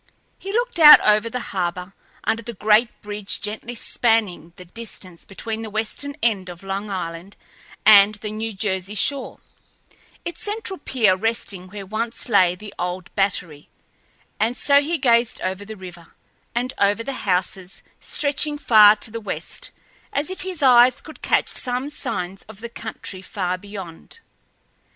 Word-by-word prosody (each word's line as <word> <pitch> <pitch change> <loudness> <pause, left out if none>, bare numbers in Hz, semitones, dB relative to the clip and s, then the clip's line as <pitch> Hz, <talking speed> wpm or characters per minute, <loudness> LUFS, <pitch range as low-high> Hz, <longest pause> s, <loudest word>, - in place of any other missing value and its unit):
He 390 - -6
looked 480 -3 -1
out 300 -2 +11
over 215 +2 +3
the 250 - -3
harbor, 180 0 -3 0.3
under 225 - 0
the 235 0 -8
great 215 +4 +4
bridge 205 -1 -2
gently 220 +3 -5
spanning 220 -9 0
the 180 - -12
distance 185 -3 -9
between 220 +3 -5
the 220 - -6
western 220 +7 -4
end 200 -6 +1
of 175 +1 -10
Long 195 +2 -4
Island 180 0 -6 0.5
and 210 0 +8
the 210 0 -6
New 220 +1 -4
Jersey 190 0 -2
shore 270 +6 0 0.8
its 345 -1 -6
central 415 -2 -3
pier 225 -9 +2
resting 200 -3 -2
where 200 +1 -8
once 225 +6 -3
lay 185 -5 +4
the 205 +2 -11
old 180 +1 -4
Battery 180 -7 -2 0.7
and 235 +3 0
so 280 0 +4
he 330 +4 -1
gazed 235 -4 +2
over 190 +2 -3
the 215 +1 -9
river, 175 -3 -12 0.4
and 250 +2 -1
over 205 +3 +2
the 275 - -4 0.2
houses 180 0 -2 0.2
stretching 295 +1 +1
far 215 -6 +7
to 215 +1 -8
the 230 +1 -5
west, - - -6 0.4
as 290 +5 -2
if 375 - -6
his 365 -5 -4
eyes 250 -1 +6
could 315 - -13
catch - - +2
some 255 +3 -3
signs 185 -8 -4
of 215 -2 -11
the 235 +1 -7
country 220 -4 -7
far 185 -2 -2
beyond. 190 - -10
215 Hz, 155 wpm, -22 LUFS, 190-240 Hz, 0.8 s, out